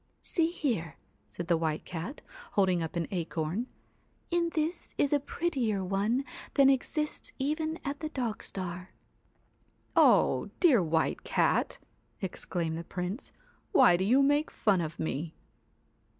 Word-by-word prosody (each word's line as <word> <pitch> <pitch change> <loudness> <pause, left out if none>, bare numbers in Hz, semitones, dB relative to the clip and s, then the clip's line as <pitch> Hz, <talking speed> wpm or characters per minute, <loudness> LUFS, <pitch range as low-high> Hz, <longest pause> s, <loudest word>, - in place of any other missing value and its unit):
'See 330 -2 +1
here,' 230 - -2 0.3
said 170 +12 -6
the 170 - +4
White 160 -1 -1
Cat, 180 - -6 0.3
holding 185 -3 +3
up 160 +1 -4
an 170 -1 0
acorn. 170 +4 -2 0.3
' - - -39
In 340 0 +2
this 320 +2 -2
is 285 - +2
a 290 - +4
prettier 260 - -1
one 210 +8 0 0.3
than 275 -1 +7
exists 300 +3 -1
even 310 +3 -1
at 280 0 -3
the 310 - -3
dog 245 -7 -3
star.' 180 -1 -5 1.1
'Oh! - - +5
dear 290 - +6
White 160 -1 0
Cat!' - - +1 0.4
exclaimed 170 -4 -3
the - - -5
Prince, 180 +7 -5 0.4
1 - - +4
why 175 - +8
do 180 - 0
you 255 +8 +4
make 290 +2 +3
fun 195 -5 +2
of 160 -1 -4
me 160 +1 -3
205 Hz, 145 wpm, -30 LUFS, 170-285 Hz, 1.1 s, why